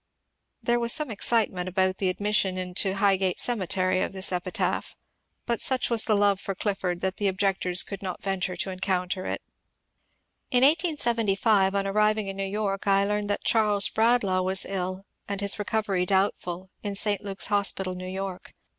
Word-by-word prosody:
There 240 Hz, 0 st, +2 dB
was 235 Hz, 0 st, 0 dB
some 305 Hz, -5 st, +1 dB
excitement 200 Hz, -4 st, +1 dB
about 185 Hz, 0 st, 0 dB
the 190 Hz, -, +1 dB
admission 200 Hz, -1 st, 0 dB
into 185 Hz, +1 st, 0 dB
High 195 Hz, -1 st, +3 dB
gate 185 Hz, -1 st, -1 dB
Cemetery 185 Hz, -4 st, +1 dB
of -, -, -2 dB
this 190 Hz, 0 st, -1 dB
epitaph, 180 Hz, 0 st, -2 dB, 0.5 s
but 235 Hz, -1 st, -1 dB
such 260 Hz, -2 st, +1 dB
was 230 Hz, -2 st, +2 dB
the 215 Hz, -, +2 dB
love 200 Hz, -1 st, +3 dB
for 195 Hz, -1 st, -4 dB
Clif 200 Hz, +1 st, -2 dB
ford 180 Hz, -1 st, -2 dB
that 190 Hz, 0 st, -2 dB
the 205 Hz, -, 0 dB
objectors 190 Hz, -2 st, +1 dB
could 200 Hz, -1 st, -8 dB
not 185 Hz, -2 st, -5 dB
venture 190 Hz, -2 st, -1 dB
to 190 Hz, -, -2 dB
encounter 185 Hz, 0 st, -2 dB
it. -, -, -4 dB, 1.1 s
In 250 Hz, 0 st, +3 dB
1875, 230 Hz, -, +2 dB
on 195 Hz, 0 st, +1 dB
arriving 215 Hz, +1 st, +2 dB
in 195 Hz, -, -4 dB
New 195 Hz, -, -3 dB
York, 200 Hz, 0 st, -3 dB
I 195 Hz, 0 st, +4 dB
learned 210 Hz, 0 st, -1 dB
that 205 Hz, -, -1 dB
Charles 210 Hz, -3 st, +2 dB
Bradlaugh 220 Hz, -5 st, +2 dB
was 185 Hz, +1 st, +2 dB
ill, 185 Hz, 0 st, -4 dB, 0.2 s
and 200 Hz, -1 st, -3 dB
his 200 Hz, 0 st, +1 dB
reooveiy 205 Hz, -3 st, -1 dB
doubtful, 190 Hz, -1 st, -1 dB
in 205 Hz, -1 st, -4 dB
St. 205 Hz, -1 st, 0 dB
Luke's 195 Hz, -1 st, -1 dB
Hospital, 195 Hz, -2 st, +1 dB
New 185 Hz, 0 st, -7 dB
York. 190 Hz, -1 st, -6 dB
195 Hz, 175 wpm, -26 LUFS, 185-210 Hz, 1.1 s, I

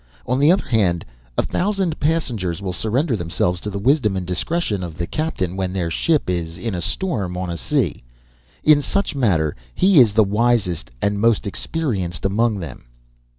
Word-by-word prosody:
On 130 Hz, -, 0 dB
the 145 Hz, +4 st, +6 dB
other 185 Hz, -, +2 dB
hand, 90 Hz, -8 st, +1 dB, 0.3 s
a -, -, +3 dB
thousand 190 Hz, -4 st, -1 dB
passengers 120 Hz, -, -1 dB
will 95 Hz, -2 st, -4 dB
surrender 120 Hz, -, 0 dB
themselves 90 Hz, 0 st, -1 dB
to 105 Hz, -, -4 dB
the 100 Hz, -, -4 dB
wisdom 110 Hz, -2 st, +2 dB
and 90 Hz, -, -3 dB
discretion 100 Hz, -, -1 dB
of 85 Hz, -2 st, -7 dB
the 85 Hz, -, -1 dB
captain, 95 Hz, -, -2 dB
when 95 Hz, -1 st, -2 dB
their 85 Hz, -3 st, -1 dB
ship 155 Hz, -, +1 dB
is 85 Hz, -2 st, -2 dB
in 105 Hz, +5 st, -3 dB
a 90 Hz, -, -3 dB
storm 100 Hz, -, -2 dB
on 90 Hz, -1 st, -3 dB
the 85 Hz, -, -3 dB
sea. -, -, -1 dB, 0.6 s
In 150 Hz, -1 st, +6 dB
such 200 Hz, +8 st, -1 dB
matter, 90 Hz, -, +1 dB, 0.2 s
he 190 Hz, -4 st, +5 dB
is 115 Hz, -5 st, +6 dB
the 110 Hz, +1 st, +5 dB
wisest 100 Hz, -, +1 dB
and 100 Hz, 0 st, +1 dB
most 115 Hz, -1 st, +3 dB
experienced 100 Hz, -, -3 dB
among 110 Hz, +2 st, +2 dB
them. 85 Hz, -8 st, -8 dB
100 Hz, 180 wpm, -21 LUFS, 90-140 Hz, 0.6 s, the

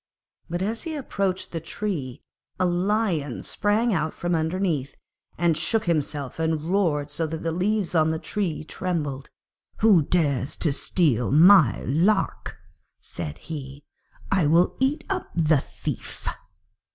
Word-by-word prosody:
But 175 Hz, +2 st, -2 dB
as 225 Hz, +3 st, -2 dB
he 325 Hz, -2 st, -4 dB
approached 200 Hz, -9 st, -2 dB
the 165 Hz, -, -3 dB
tree 160 Hz, -6 st, -4 dB, 0.4 s
a 185 Hz, -, +3 dB
Lion 175 Hz, -, 0 dB
sprang 215 Hz, +3 st, +1 dB
out 160 Hz, -3 st, -1 dB
from 175 Hz, 0 st, -2 dB
underneath, 160 Hz, -4 st, -1 dB, 0.4 s
and 170 Hz, -1 st, +2 dB
shook 220 Hz, +8 st, +1 dB
himself, 150 Hz, -4 st, -1 dB
and 160 Hz, 0 st, -1 dB
roared 155 Hz, -7 st, +1 dB
so 160 Hz, +2 st, -1 dB
that 160 Hz, +1 st, -5 dB
the 165 Hz, -, 0 dB
leaves 190 Hz, +3 st, 0 dB
on 160 Hz, -2 st, +3 dB
the 160 Hz, -, 0 dB
tree 170 Hz, -2 st, -3 dB
trembled. 150 Hz, -6 st, -3 dB, 0.5 s
'Who 210 Hz, -6 st, +6 dB
dares 145 Hz, -4 st, 0 dB
to 155 Hz, -, 0 dB
steal 135 Hz, -, +1 dB
my 160 Hz, -, +6 dB
lark?' 175 Hz, -, 0 dB, 0.4 s
said 75 Hz, -3 st, -6 dB
he. 140 Hz, -2 st, -8 dB, 0.5 s
'I 185 Hz, -6 st, +3 dB
will 170 Hz, +4 st, +3 dB
eat 285 Hz, +4 st, +1 dB
up 380 Hz, -2 st, -3 dB
the 155 Hz, -3 st, +3 dB
thief!' -, -, -6 dB
165 Hz, 140 wpm, -25 LUFS, 150-195 Hz, 0.5 s, Who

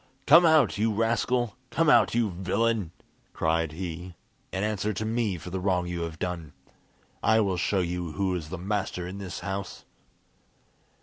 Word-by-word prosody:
"Come 165 Hz, +4 st, +8 dB
out, 155 Hz, -10 st, +4 dB
you 110 Hz, +1 st, +2 dB
rascal! 115 Hz, +2 st, 0 dB
come 165 Hz, +4 st, +1 dB
out, 150 Hz, -, +5 dB
you 115 Hz, -4 st, +2 dB
villain!" 100 Hz, +2 st, 0 dB, 0.4 s
cried 80 Hz, -1 st, 0 dB
he, 90 Hz, +1 st, -6 dB, 0.4 s
"and 95 Hz, +2 st, -1 dB
answer 105 Hz, 0 st, -1 dB
to 110 Hz, +3 st, -3 dB
me 110 Hz, -4 st, 0 dB
for 90 Hz, +2 st, -9 dB
the 95 Hz, -, -2 dB
wrong 90 Hz, -1 st, +1 dB
you 85 Hz, -1 st, -4 dB
have 85 Hz, -1 st, -4 dB
done. 85 Hz, -3 st, -4 dB, 0.7 s
I 110 Hz, 0 st, +4 dB
will 100 Hz, -4 st, +1 dB
show 95 Hz, +2 st, +1 dB
you 85 Hz, -2 st, -3 dB
who 95 Hz, -2 st, 0 dB
is 80 Hz, -4 st, -4 dB
the 95 Hz, -, -5 dB
master 95 Hz, -1 st, -2 dB
in 95 Hz, +3 st, -6 dB
this 95 Hz, -3 st, -6 dB
house!" 100 Hz, -1 st, -5 dB
95 Hz, 170 wpm, -27 LUFS, 90-110 Hz, 0.7 s, Come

